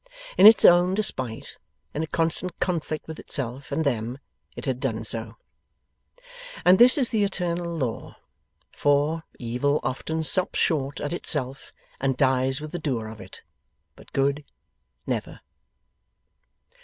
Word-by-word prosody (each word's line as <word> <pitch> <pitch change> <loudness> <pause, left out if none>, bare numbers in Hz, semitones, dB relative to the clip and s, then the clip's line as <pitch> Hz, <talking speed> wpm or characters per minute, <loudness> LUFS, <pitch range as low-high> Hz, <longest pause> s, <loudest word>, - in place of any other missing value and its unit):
In - - +8
its 220 - +7
own 175 +2 +5
despite, 130 - -2 0.3
in 150 - -3
a 160 - -3
constant 165 +2 -1
conflict 160 -4 -3
with 160 -1 -8
itself 135 +1 -3
and 155 +3 -1
them, 120 -2 -2 0.4
it - - -8
had 130 -3 -2
done 115 -5 -3
so. 115 0 -4 1.3
And 185 +1 +6
this 245 +4 +8
is 260 -4 +4
the 220 -3 +1
eternal 175 -3 -2
law. 125 -7 -4 0.5
For, 145 +3 +1 0.2
Evil 125 +5 -1
often 160 +5 -3
stops 185 +4 +3
short 145 -4 0
at 145 - -4
itself 135 -6 -3 0.3
and 135 -1 -1
dies 130 +1 +1
with 155 0 -8
the 175 - -5
doer 115 -7 -3
of 110 -1 -11
it; 95 -1 -13 0.5
but - - -18
Good, 140 +2 0 0.6
never. - - -4
145 Hz, 140 wpm, -24 LUFS, 130-170 Hz, 1.3 s, In